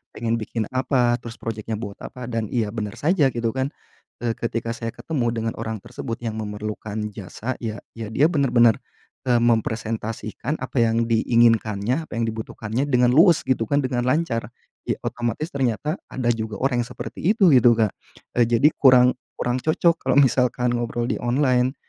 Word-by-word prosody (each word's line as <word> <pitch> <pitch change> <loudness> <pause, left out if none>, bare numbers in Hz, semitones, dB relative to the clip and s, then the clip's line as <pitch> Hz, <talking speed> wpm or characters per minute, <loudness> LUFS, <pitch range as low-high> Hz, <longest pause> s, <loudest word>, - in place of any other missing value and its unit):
pengen 115 0 -1
bikin 110 +1 -3
apa, 130 -2 +1
terus 115 0 -9
proyeknya 110 -1 -4
buat 105 -2 -6
apa, 125 -1 -8
dan 115 -1 -1
iya 110 -2 -1
benar 110 -1 -4
saja 150 - +2
gitu 115 -1 -1
kan, 130 +3 -1 0.6
eee, 115 - +1
ketika 115 0 -2
saya 115 -1 -4
ketemu 135 -7 -2
dengan 115 0 -2
orang 110 -3 -4
tersebut 115 -3 -5
yang 110 -2 -3
memerlukan 105 0 -5 0.2
jasa, 110 +5 -6
ya 110 -2 -5 0.2
ya 115 -1 -5
dia 155 +8 +4
benar-benar, 120 -6 +4 0.5
eee, 125 - +4
mempresentasikan 115 +2 -1
apa 130 0 -2
yang 115 0 +2
diinginkannya, 115 +3 +2
apa - - -10
yang - - +1
dibutuhkannya 110 +3 -3
dengan 125 -3 +3
luwes 165 +4 +5
gitu 115 -4 +1
kan, 145 0 +1
dengan 125 -1 -1
lancar. 130 -4 0 0.4
Ya - - +1
otomatis 120 +6 -3
ternyata 140 - -1
ada 125 -2 -2
juga 110 -2 -3
orang 125 -3 +1
yang - - -13
seperti - - -7 0.2
itu 190 -7 +5
gitu 120 -2 +6
Kak, 110 -3 +2 0.5
eee, 120 - +5
jadi 120 +5 +4
kurang 125 -2 +7 0.2
kurang 125 +1 -1
cocok 165 +3 +2
kalau - - +1
misalkan 125 -2 +2
ngobrol 120 0 -2
di - - -1
online, 125 +1 +1
120 Hz, 170 wpm, -23 LUFS, 115-130 Hz, 0.6 s, kurang